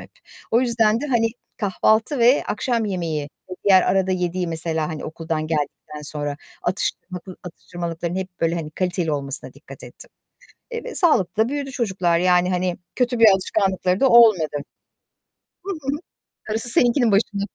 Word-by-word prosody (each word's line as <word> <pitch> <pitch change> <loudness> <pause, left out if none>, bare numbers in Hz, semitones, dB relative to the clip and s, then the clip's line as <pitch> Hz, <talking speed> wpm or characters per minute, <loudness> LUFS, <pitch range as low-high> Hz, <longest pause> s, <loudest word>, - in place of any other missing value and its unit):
hep. - - -13 0.4
O 230 - +4
yüzden 230 -3 +2
de 295 - -3
hani, 235 -5 +2 0.3
kahvaltı 220 +6 +1
ve 245 +4 +5
akşam 230 +1 0
yemeği 170 -7 -2 0.3
ve - - -4
diğer 190 -2 +6
arada 190 0 +1
yediği, 180 0 -1
mesela, 160 -1 -1
hani, 160 -3 -6
okuldan 160 -1 -3
geldikten 150 -1 -4
sonra, 145 -1 -3 0.3
atıştırmalık 185 0 -4
atıştırmalıkların 175 0 -5
hep, 190 0 -3
böyle, 165 0 +1
hani, 160 -3 -4
kaliteli 175 -1 -1
olmasına 140 -2 -3
dikkat - - -13
ettim, - - -12 0.6
eee, 470 -1 -5
ve - - -7
sağlıklı 215 - +2
da - - -3
büyüdü 280 0 -3
çocuklar, 190 -9 0
yani, 180 0 +3
hani, 180 -1 -1 0.2
kötü 245 -1 0
bir 230 - +7
alışkanlıkları 190 -1 0
da 270 - +5
olmadı. 220 -11 +5 1.1
Hı 395 - -3
hı. 275 +2 -2 0.5
Darısı 220 +3 -2
seninkinin 240 -1 +3
başına. 200 0 +1
185 Hz, 155 wpm, -22 LUFS, 170-230 Hz, 1.1 s, bir